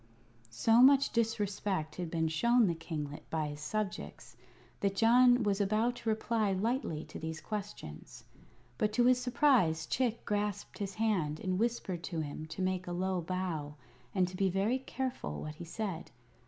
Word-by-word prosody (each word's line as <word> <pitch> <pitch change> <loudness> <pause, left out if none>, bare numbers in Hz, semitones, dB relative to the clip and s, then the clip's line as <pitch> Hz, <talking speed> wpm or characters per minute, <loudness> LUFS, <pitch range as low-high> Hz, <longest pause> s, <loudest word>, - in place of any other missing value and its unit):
So 225 - +4
much 275 +1 +6
disrespect 205 -7 -1
had 175 -2 -3
been 160 -1 0
shown 235 +9 +3
this 170 -4 0
kinglet 150 -3 -6
by 155 -2 -1
his 145 0 -7
subjects 205 +5 -4 0.4
that 200 -1 0
John 245 +2 +5
was 205 -1 +1
about 220 +5 +1
to 225 - -3
reply 220 -2 +1
lightly 195 - -1
to - - -9
these 160 0 -5
questions; 205 - -7 0.6
but 210 - +2
to 240 +2 +3
his 250 0 +4
surprise 240 - +3
Chick 235 +4 -1
grasped 205 -1 -2
his 195 -2 -4
hand 185 -9 0
and 185 0 -1
whispered 225 -6 -1
to 165 -4 -3
him 155 +1 -6
to 185 +4 -4
make 185 -1 -1
a 175 - -3
low 185 0 -1
bow 165 -4 -3 0.4
and 185 -1 +3
to 180 - -8
be 195 +1 +2
very 200 +8 +1
careful 255 - -4
what 155 - -5
he 170 - -7
said. 185 -1 -4
195 Hz, 170 wpm, -32 LUFS, 165-225 Hz, 0.6 s, much